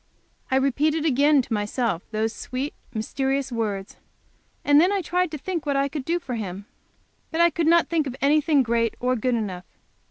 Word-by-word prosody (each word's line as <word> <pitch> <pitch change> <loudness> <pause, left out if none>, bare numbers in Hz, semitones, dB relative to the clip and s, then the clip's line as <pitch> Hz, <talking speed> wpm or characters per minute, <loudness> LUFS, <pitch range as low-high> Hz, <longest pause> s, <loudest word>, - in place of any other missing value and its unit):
I 260 - +1
repeated 295 +4 +1
again 285 -1 +4
to 235 - -5
myself 210 -2 -1
those 220 +1 -1
sweet, 265 +3 -4 0.2
mysterious 265 +4 -2
words, 210 -4 -3 0.7
and 290 +1 +6
then 360 +3 +3
I 400 -2 0
tried 360 +2 0
to 305 - -5
think 335 +2 -4
what 285 - +1
I 275 0 +2
could 280 -2 -5
do 340 +1 +1
for 275 -7 -6
Him. 200 -3 -5 0.6
But 325 - -3
I 340 0 +5
could 325 +1 0
not 340 +1 +5
think 320 -4 0
of 255 - -5
anything 295 0 +3
great 230 -1 0
or 250 +1 +1
good 250 +1 0
enough. 190 -5 -4
270 Hz, 190 wpm, -24 LUFS, 230-310 Hz, 0.7 s, and